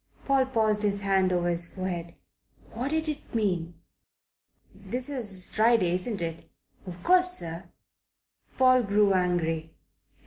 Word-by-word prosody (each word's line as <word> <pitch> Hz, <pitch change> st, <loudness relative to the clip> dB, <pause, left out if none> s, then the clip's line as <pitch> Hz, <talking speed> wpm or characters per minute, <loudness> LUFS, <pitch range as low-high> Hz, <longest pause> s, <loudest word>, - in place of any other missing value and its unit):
Paul 270 Hz, -1 st, +2 dB
passed 220 Hz, -4 st, +1 dB
his 200 Hz, -1 st, -1 dB
hand 190 Hz, -2 st, +2 dB
over 175 Hz, -1 st, 0 dB
his 170 Hz, -1 st, 0 dB
forehead. 175 Hz, -3 st, -5 dB, 0.6 s
What 250 Hz, +5 st, -3 dB
did 315 Hz, +1 st, -1 dB
it 300 Hz, -5 st, -6 dB
mean? 180 Hz, -6 st, -1 dB, 1.0 s
"This 250 Hz, +2 st, -5 dB
is 205 Hz, -9 st, +1 dB
Friday, 220 Hz, -5 st, +2 dB
isn't 185 Hz, +1 st, -2 dB
it?" 165 Hz, 0 st, -6 dB, 0.4 s
"Of 175 Hz, -1 st, -9 dB
course, 365 Hz, 0 st, +4 dB
sir." 170 Hz, -, -2 dB, 0.9 s
Paul 255 Hz, -1 st, +5 dB
grew 205 Hz, -2 st, +2 dB
angry. 165 Hz, -3 st, -1 dB
195 Hz, 130 wpm, -27 LUFS, 175-240 Hz, 1.0 s, Paul